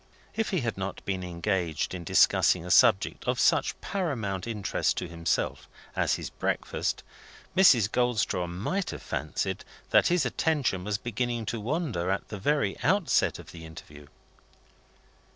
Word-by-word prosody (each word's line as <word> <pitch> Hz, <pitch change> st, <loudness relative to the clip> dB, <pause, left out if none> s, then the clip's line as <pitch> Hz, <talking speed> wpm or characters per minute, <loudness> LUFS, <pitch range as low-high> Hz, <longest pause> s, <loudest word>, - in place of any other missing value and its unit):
If 225 Hz, 0 st, 0 dB
he 185 Hz, -6 st, 0 dB
had 115 Hz, -5 st, -3 dB
not 95 Hz, 0 st, -5 dB
been 95 Hz, -2 st, -2 dB
engaged 85 Hz, -2 st, -2 dB
in 90 Hz, -2 st, -5 dB
discussing 85 Hz, 0 st, +4 dB
a 90 Hz, -, -4 dB
subject -, -, +4 dB
of -, -, 0 dB
such -, -, +2 dB
paramount 115 Hz, -, -2 dB
interest 105 Hz, -4 st, -1 dB
to 90 Hz, -, -3 dB
himself 85 Hz, -1 st, -2 dB, 0.3 s
as -, -, +2 dB
his -, -, -6 dB
breakfast, -, -, -2 dB, 0.5 s
Mrs. 130 Hz, -, +6 dB
Goldstraw 120 Hz, -7 st, +1 dB
might 105 Hz, -, -2 dB
have -, -, -7 dB
fancied 75 Hz, +2 st, -3 dB, 0.3 s
that -, -, +5 dB
his 175 Hz, -5 st, +2 dB
attention 125 Hz, -, 0 dB
was 105 Hz, +1 st, -1 dB
beginning 120 Hz, +1 st, -2 dB
to 115 Hz, +1 st, -3 dB
wander 125 Hz, -, -2 dB
at 95 Hz, -, -2 dB
the 105 Hz, -, -6 dB
very 140 Hz, -4 st, 0 dB
outset 180 Hz, +7 st, +2 dB
of -, -, -12 dB
the 80 Hz, -, -10 dB
interview. 75 Hz, -2 st, -12 dB
105 Hz, 150 wpm, -28 LUFS, 90-135 Hz, 0.5 s, Mrs